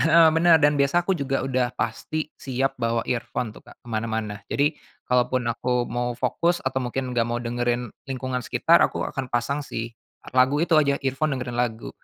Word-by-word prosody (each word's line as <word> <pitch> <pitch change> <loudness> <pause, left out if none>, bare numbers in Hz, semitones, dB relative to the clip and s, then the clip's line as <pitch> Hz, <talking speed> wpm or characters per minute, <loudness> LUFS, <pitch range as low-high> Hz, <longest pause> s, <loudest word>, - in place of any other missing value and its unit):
Heeh, 165 0 +6
bener. 165 0 +6
Dan 145 0 +4
biasa 170 +5 +3
aku 190 - +2
juga 135 -1 -1 0.3
pasti 155 +7 -3
siap 135 0 -2
bawa 115 0 +1
earphone 120 -2 -2
tuh - - -14
Kak, - - -15
ke - - -13
mana-mana. 110 -2 -2
Jadi, 145 +2 +2 0.3
kalaupun 125 0 +1
aku 125 +1 0
mau 120 +1 -1
fokus 175 +1 0
atau 130 0 -1
mungkin 125 +1 -3
enggak 115 -2 +1
mau 120 0 -1
dengerin 120 0 -1 0.2
lingkungan 130 -1 -2
sekitar, - - +4
aku - - -4
akan 135 - -4
pasang 120 +5 -1
sih. 115 +1 -4 0.5
Lagu 130 +3 +5
itu 170 -1 +2
aja, 140 -2 +3
earphone, 135 +2 0
dengerin 125 -1 -4
lagu. 115 -2 -1
125 Hz, 180 wpm, -24 LUFS, 120-140 Hz, 0.5 s, Heeh